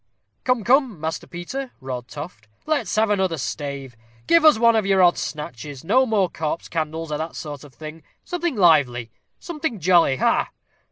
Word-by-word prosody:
"Come, 250 -3 +1
come, 250 - +2
Master 160 +1 -4
Peter," 245 +10 -6
roared 130 -2 -6
Toft, 145 -8 -9 0.2
"let's 285 -11 -1
have 215 0 +2
another 190 -5 +1
stave. 140 -2 -5 0.3
Give 335 -1 +4
us 310 -6 +7
one 230 0 +4
of 220 - +2
your 195 -1 +3
odd 175 -1 +5
snatches. 145 -2 -6
No 255 +9 +3
more 210 -5 +2
corpse 160 -1 -4
candles, 160 -1 -3
or 150 - -2
that 160 +1 -5
sort 145 -2 -7
of 145 -3 -15
thing. 155 +1 -9 0.2
Something 345 -4 -2
lively 140 - +3 0.3
something 310 - -4
jolly 170 -5 +4
ha, - - +2
ha!" - - -22
170 Hz, 175 wpm, -22 LUFS, 150-225 Hz, 0.3 s, us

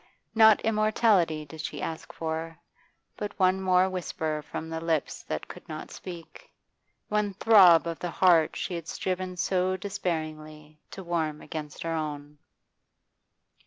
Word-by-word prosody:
Not 220 -1 +6
immortality 215 -7 +2
did 155 +1 -9
she 150 - -5
ask 160 +2 -5
for, 160 0 -4 0.6
but 210 -1 -6
one 185 0 +3
more 185 0 +4
whisper 160 -4 -3
from 160 - -5
the 160 0 -5
lips 165 -2 -1
that - - -5
could - - -12
not - - -7
speak, 170 -3 -10 0.6
one 210 -2 -1
throb 190 -6 +7
of 165 -1 -4
the 175 - -3
heart 170 -2 +4
she 185 - -3
had 170 -2 -5
striven 185 0 -3
so 185 +1 +1
despairingly 155 -5 -5
to 190 - -8
warm 160 -3 -2
against 150 -2 -7
her 165 0 -2
own. 150 -2 -5
170 Hz, 140 wpm, -27 LUFS, 155-185 Hz, 0.6 s, throb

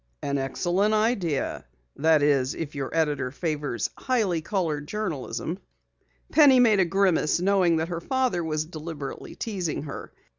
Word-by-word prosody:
"An 140 0 -1
excellent 180 +10 +1
idea. 205 - 0 0.3
That 155 0 +3
is, 140 -3 +2
if 155 -3 -5
your 140 -2 -3
editor 150 -5 0
favors 145 - -3
highly 215 -10 0
colored 155 -5 -2
journalism." 160 - -4 0.7
Penny 280 -5 +7
made 220 -5 +5
a 185 - +4
grimace, 175 -3 +2
knowing 185 -2 +3
that 160 +1 -1
her 170 -1 -4
father 255 -9 0
was 155 -1 -1
deliberately 155 -3 -7
teasing 185 -10 -3
her. 140 - -7
165 Hz, 140 wpm, -26 LUFS, 145-195 Hz, 0.7 s, Penny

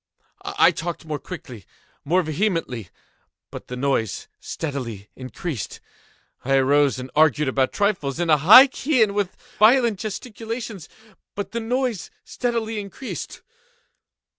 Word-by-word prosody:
I - - +4
talked 170 0 -5
more 150 -2 -4
quickly—more 160 - -5
vehemently; 155 - -2 0.6
but - - -9
the 125 - -6
noise 125 -6 -1
steadily 120 -10 -5
increased. 130 - -6 0.6
I 135 +1 +1
arose 140 +1 +3
and 130 0 -7
argued 150 -1 +3
about 130 0 +1
trifles, 180 -9 -1
in 175 - 0
a 155 - +6
high 205 - +9
key 265 -1 +1
and 205 -2 0
with 200 -2 -1 0.2
violent 230 -1 +5
gesticulations; 220 -2 -6 0.5
but 195 -1 -5
the 235 - -2
noise 240 -2 -2
steadily 230 -3 -2
increased. 205 +6 -7
175 Hz, 120 wpm, -23 LUFS, 135-220 Hz, 0.6 s, high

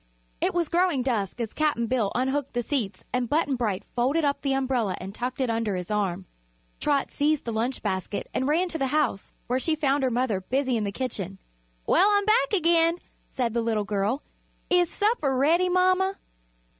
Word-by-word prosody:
It - - 0
was 345 -2 +1
growing 345 -6 +2
dusk 230 -4 -1
as 230 -2 -3
Cap'n 300 -7 +1
Bill 230 -4 0
unhooked 265 +3 -1
the 240 0 -1
seats 220 -8 -2
and 250 -2 0
Button 295 -3 +1
Bright 210 -5 -1
folded 275 +6 +2
up 280 0 0
the 275 -1 0
umbrella 255 -7 0
and 190 +2 -7
tucked 250 +4 -4
it 260 -2 +1
under 225 -3 -1
his 180 +2 -5
arm. 195 -3 -1 0.5
Trot 285 -2 +1
seized 300 0 +1
the 230 - -2
lunch 235 +4 -2
basket 190 0 -2
and 260 - 0
ran 335 +5 +2
to 325 - -4
the 270 - +1
house, 290 -8 0
where 250 +2 0
she 315 +4 +1
found 285 -2 +1
her 260 - +2
mother 235 -5 0
busy 260 +5 0
in 215 -2 0
the 200 - -2
kitchen. 200 -6 -4 0.5
"Well, 395 - +4
I'm 405 -1 +3
back 430 -10 +3
again," 335 -2 +3 0.3
said 240 -3 -2
the 235 - +1
little 220 -2 0
girl. 210 +6 -1 0.5
"Is 355 -2 +4
supper 405 - +1
ready, 335 +7 +3
mama?" 370 +1 +2
260 Hz, 195 wpm, -26 LUFS, 225-310 Hz, 0.5 s, Well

